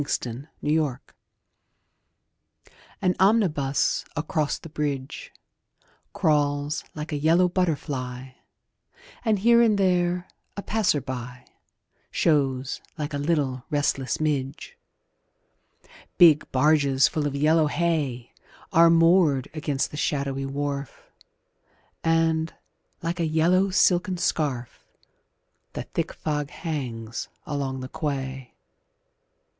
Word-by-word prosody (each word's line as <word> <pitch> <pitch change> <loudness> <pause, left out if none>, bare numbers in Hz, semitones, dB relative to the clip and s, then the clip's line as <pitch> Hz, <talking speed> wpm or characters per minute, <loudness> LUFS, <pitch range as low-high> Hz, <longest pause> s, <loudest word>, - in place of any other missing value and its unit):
SYMPHONY 130 0 -4 0.2
IN 150 - 0
YELLOW 150 -5 +1 2.1
AN 180 -1 +2
omnibus 180 -10 +2
across 150 0 -1
the - - -11
bridge 145 -3 -4 0.8
Crawls 145 -1 0
like 150 +1 -6
a 150 - -1
yellow 165 +4 +4
butterfly 140 -8 -2 0.9
And, 220 -3 +2
here 235 +4 +5
and 220 -3 +4
there, 180 -2 +1 0.3
a 200 - -4
passer 210 -9 +1
by 125 -1 -7 0.6
Shows 135 -4 0 0.2
like 150 -1 -4
a 145 - -2
little 140 -5 0
restless 145 -2 0
midge. 145 - -2 1.4
Big 165 -5 +6
barges 140 -1 +4
full 150 -2 -1
of 140 - -4
yellow 155 +2 +3
hay 145 -7 -1 0.4
Are 165 +1 +7
moored 165 -5 +4
against 150 -3 -2
the 150 - -7
shadowy 140 -2 -1
wharf, 140 -1 -5 0.9
And, 165 0 +2 0.5
like 170 +2 -2
a 165 - +1
yellow 175 +5 +3
silken 185 0 +2
scarf, 140 -8 -2 0.9
The - - -4
thick - - -3
fog 150 -2 -3
hangs 125 -10 -5 0.2
along 135 -2 -3
the 130 - -5
quay. 135 -3 -4
150 Hz, 105 wpm, -25 LUFS, 135-165 Hz, 2.1 s, Are